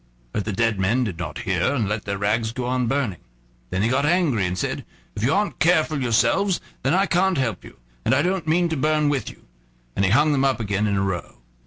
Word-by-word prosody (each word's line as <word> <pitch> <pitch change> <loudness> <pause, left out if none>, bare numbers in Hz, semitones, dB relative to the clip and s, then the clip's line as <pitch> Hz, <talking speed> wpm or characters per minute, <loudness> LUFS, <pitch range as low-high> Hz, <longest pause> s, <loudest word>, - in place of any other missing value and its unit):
But 105 - -2
the 105 - -2
dead 110 0 0
men 110 +7 +2
did 95 -8 -4
not 90 - -5
hear 95 +8 +1
and 115 -7 0
let 105 +1 -3
their 100 0 -2
rags 110 +3 0
go 125 0 -3
on 125 -1 0
burning. 120 - -1 0.5
Then 95 +2 -1
he - - +3
got 130 +4 +1
angry, 150 - +2
and 90 +1 -3
said: - - -2 0.3
"If - - -5
you 130 - +3
aren't 205 +4 0
careful 155 -4 +2
yourselves, 120 - +2 0.2
then 135 +6 +1
I 195 +1 +3
can't 190 -1 +2
help 120 -5 -1
you, - - -14 0.3
and - - +2
I 140 - +2
don't 180 -2 -1
mean 170 +2 +3
to 160 - -1
burn 150 +1 +2
with 135 -6 -1
you"; - - -15 0.5
and 100 - +1
he 95 - +3
hung 145 +8 +4
them 135 -2 +2
up 135 -2 +2
again 105 -1 0
in 100 -1 0
a 95 - +1
row. 95 -3 -3
125 Hz, 240 wpm, -23 LUFS, 105-155 Hz, 0.5 s, hung